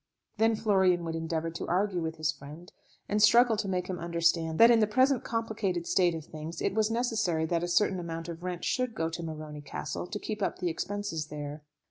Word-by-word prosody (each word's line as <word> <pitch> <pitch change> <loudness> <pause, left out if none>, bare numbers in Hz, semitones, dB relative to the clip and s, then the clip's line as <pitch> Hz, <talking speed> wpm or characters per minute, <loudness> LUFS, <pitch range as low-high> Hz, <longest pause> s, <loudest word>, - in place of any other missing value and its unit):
Then 225 +1 +3
Florian 190 -5 +2
would 165 - -3
endeavour 165 0 -2
to 165 - -5
argue 185 0 +1
with 160 0 -3
his 155 -1 0
friend, 155 +8 -12 0.3
and 210 +1 0
struggle 230 +3 +6
to 205 -1 -2
make 180 -1 -1
him 185 -1 -4
understand 170 -1 +1
that 230 +1 +8
in 230 - +5
the 215 - +3
present 260 +4 +3
complicated 215 -6 -2
state 175 -2 +2
of 160 -2 -7
things 160 0 -7
it - - 0
was 215 0 +2
necessary 220 -9 0
that 170 +1 0
a - - -1
certain 185 +1 +2
amount 165 -1 -5
of 170 0 -7
rent 180 -1 -4
should 255 -3 0
go 160 -3 -1
to 170 - -5
Morony 155 -2 -6
Castle 145 +4 -5
to 210 - -4
keep 215 0 -5
up - - -1
the 180 -1 -1
expenses 165 -2 -3
there. 150 0 -6
175 Hz, 215 wpm, -29 LUFS, 165-210 Hz, 0.3 s, that